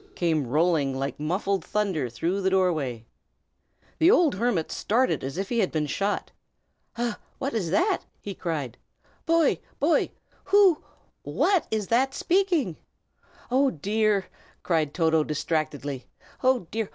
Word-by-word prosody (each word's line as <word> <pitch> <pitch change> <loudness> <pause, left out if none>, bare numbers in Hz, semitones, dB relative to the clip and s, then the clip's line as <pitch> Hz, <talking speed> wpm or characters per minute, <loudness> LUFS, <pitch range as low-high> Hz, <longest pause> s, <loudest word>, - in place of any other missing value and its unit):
came 160 -6 0
rolling 150 -1 +1
like 135 0 -3
muffled 185 +4 -1
thunder 185 -12 -1
through 170 - -2
the 190 - +2
doorway. 155 -12 0 0.9
The 325 - +6
old 350 - +5
hermit 195 -5 0
started 250 +5 +1
as 135 +5 -5
if 195 +1 -2
he 240 - 0
had 190 - +1
been 155 -1 0
shot. 200 +8 -2 0.7
"Ah! 235 -2 -2 0.2
what 275 -1 -3
is 200 -7 -1
that?" 350 - +2 0.2
he 200 - -6
cried. 155 -10 -4 0.5
"Boy! 330 -3 +3 0.2
boy! 305 +4 +2 0.4
who 390 -5 +5 0.4
what 385 -4 +1
is 215 -2 -1
that 265 +4 +2
speaking?" 345 - +1 0.7
"Oh, 270 +2 +4
dear!" 205 - 0 0.4
cried 155 -4 0
Toto, 160 -2 +3
distractedly. 145 -3 -3 0.3
"Oh, 255 -6 +2
dear! 220 -1 -2
190 Hz, 135 wpm, -26 LUFS, 155-245 Hz, 0.9 s, The